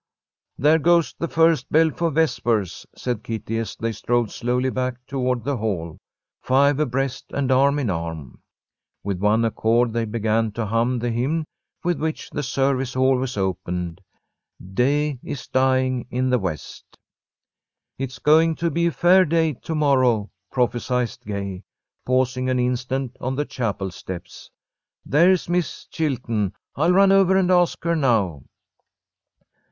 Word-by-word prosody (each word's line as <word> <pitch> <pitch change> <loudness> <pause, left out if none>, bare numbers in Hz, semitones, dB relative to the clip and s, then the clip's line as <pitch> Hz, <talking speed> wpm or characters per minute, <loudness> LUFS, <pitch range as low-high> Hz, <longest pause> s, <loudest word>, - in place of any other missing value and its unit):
"There 150 +4 +4
goes 170 +1 +3
the 170 - -1
first 160 -5 +2
bell 160 +1 +4
for 165 +3 -1
vespers," 120 - 0
said 120 -4 -3
Kitty, 115 0 -3
as 115 - -4
they 115 0 -2
strolled 115 +1 -1
slowly 125 +2 -1
back 130 -1 -2
toward 125 -3 -1
the 140 +1 -1
Hall, 90 -8 -3 0.4
five 140 +2 +3
abreast 135 -2 -1
and 135 -2 -1
arm 140 +2 +4
in 130 -9 0
arm. 80 -6 -6 0.6
With 100 -2 -3
one 105 +3 +2
accord 115 +1 +1
they 115 -1 0
began 110 0 0
to 115 +1 -2
hum 115 +4 +1
the 120 0 -2
hymn 140 +8 -1 0.4
with 175 -4 0
which 155 +1 -3
the 150 - -3
service 135 -1 0
always 130 -2 +1
opened, 90 -2 -3 0.7
"Day 140 +4 +1
is 140 - -6
dying 130 -1 +1
in 130 +1 0
the 125 - +3
west." 90 -7 -6 1.0
"It's 135 0 -4
going 160 +2 +4
to 170 +1 -1
be 170 +3 +1
a - - +1
fair 180 +3 +5
day 160 -1 +1
to 160 +6 -6
morrow," 130 -8 +2 0.2
prophesied 125 -1 0 0.2
Gay, 100 -2 -4 0.5
pausing 130 0 +1
an 130 - +1
instant 125 +1 -1
on 130 +1 -2
the 145 +2 -1
chapel 100 -8 -3
steps. 90 0 -9 0.6
"There's 175 +6 +3
Miss 175 0 -2
Chilton. 120 - -2 0.2
I'll 175 - +2
run 195 +1 +5
over 190 -1 +5
and 185 -1 +2
ask 175 -1 +2
her 170 0 +1
now." 110 - +1
130 Hz, 145 wpm, -22 LUFS, 115-150 Hz, 1.0 s, fair